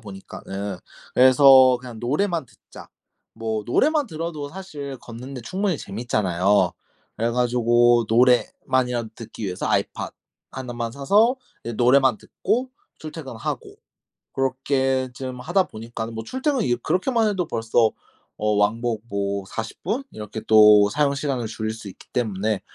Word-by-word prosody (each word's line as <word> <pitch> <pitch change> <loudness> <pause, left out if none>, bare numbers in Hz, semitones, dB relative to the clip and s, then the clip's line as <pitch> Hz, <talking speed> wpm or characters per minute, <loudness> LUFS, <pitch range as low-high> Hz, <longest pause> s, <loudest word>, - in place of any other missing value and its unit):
보니까는 95 -1 -7 0.4
그래서 130 0 +7
그냥 125 -3 -9
노래만 160 +5 0
듣자. - - -15 0.5
뭐 110 -1 -3
노래만 295 - +2
들어도 155 -3 -5
사실 145 -6 -7
걷는 125 +4 -9
데 125 - -6
충분히 185 - -1
재밌잖아요. 100 -3 +1 0.4
그래 115 +1 0
가지고 120 -1 +3
노래만이라도 125 0 +2
듣기 115 -1 -8
위해서 90 -2 -3
아이팟 - - -1 0.4
1 125 -2 -6
만 120 -1 -3
사서 205 - +3 0.3
이제 120 - -4
노래만 125 0 +4
듣고 240 +7 -2 0.3
출퇴근하고 410 -3 -6 0.6
고렇게 130 0 0
좀 130 0 -6
하다 175 +8 +2
보니까는 115 -3 -7
뭐 115 - -4
출퇴근이 260 - 0
그렇게만 225 +3 +1
해도 185 -5 -1
벌써 115 -2 +2 0.5
어 105 - -2
왕복 110 +2 0
뭐 100 -1 -2
40 115 0 -6
분? 225 - -2
이렇게 105 +1 -7
또 105 -1 +7
사용 145 +3 +1
시간을 135 -5 -2
줄일 110 0 -3
수 110 -2 -9
있기 95 - -13
때문에 110 -3 -1
125 Hz, 300 characters per minute, -23 LUFS, 110-145 Hz, 0.6 s, 그래서